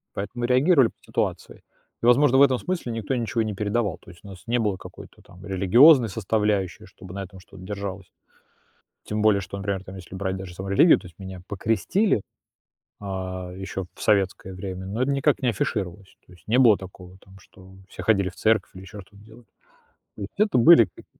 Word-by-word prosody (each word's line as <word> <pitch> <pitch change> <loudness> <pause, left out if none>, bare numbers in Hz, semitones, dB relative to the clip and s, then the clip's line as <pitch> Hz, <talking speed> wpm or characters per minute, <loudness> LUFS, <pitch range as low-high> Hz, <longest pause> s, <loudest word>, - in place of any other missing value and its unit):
Поэтому 120 +5 -4
реагировали 130 +2 +4
по - - -26
ситуации. - - -3 0.4
И, - - +1
возможно, 130 +2 +5
в - - +6
этом 130 -3 +3
смысле 180 -9 -3
никто 115 +3 -3
ничего 115 -1 -1
и - - 0
не 110 - -3
передавал, 105 -2 -1
то - - -18
есть 85 - -18
у - - -12
нас 95 -2 -12
не 120 +1 +1
было 105 -4 0
какой-то - - -13
там 90 +2 -16
религиозной 115 - +5
составляющей, 105 -2 -1
чтобы 90 -1 -13
на 100 0 -5
этом 95 0 -12
что-то 95 0 -15
держалось. 100 -1 -6 0.9
Тем 105 0 -3
более, 105 -2 +4
что, 100 +1 -7
например, 100 -1 -3
там 95 0 -10
если 90 0 -11
брать 95 0 -3
даже 95 -2 -8
саму 95 +2 -7
религию, 155 - +6
то - - -13
есть 85 - -22
меня 95 -1 -9
покрестили, 115 - 0 0.8
э, - - -11
ещё 95 -1 -5
в - - -12
советское 95 -2 +1
время. 95 0 -6
Но 110 +6 -3
это 140 - +1
никак 140 +1 +1
не 125 - +1
афишировалось, 95 -3 -3
то - - -18
есть 90 -1 -20
не 115 +4 +2
было 115 -5 +6
такого 95 -1 -12
там, 95 0 -17
что, 95 - -19 0.2
э, - - -22
все - - -8
ходили 100 -4 +2
в 90 - -12
церковь 110 -3 +1
или 95 - -10
ещё 100 +2 -10
что-то 100 +2 -18
делали. 115 +2 -17 0.7
То - - -11
есть 100 - -8
это 210 -8 +2
были 120 - +7
как - - -15
100 Hz, 210 wpm, -24 LUFS, 95-115 Hz, 0.9 s, были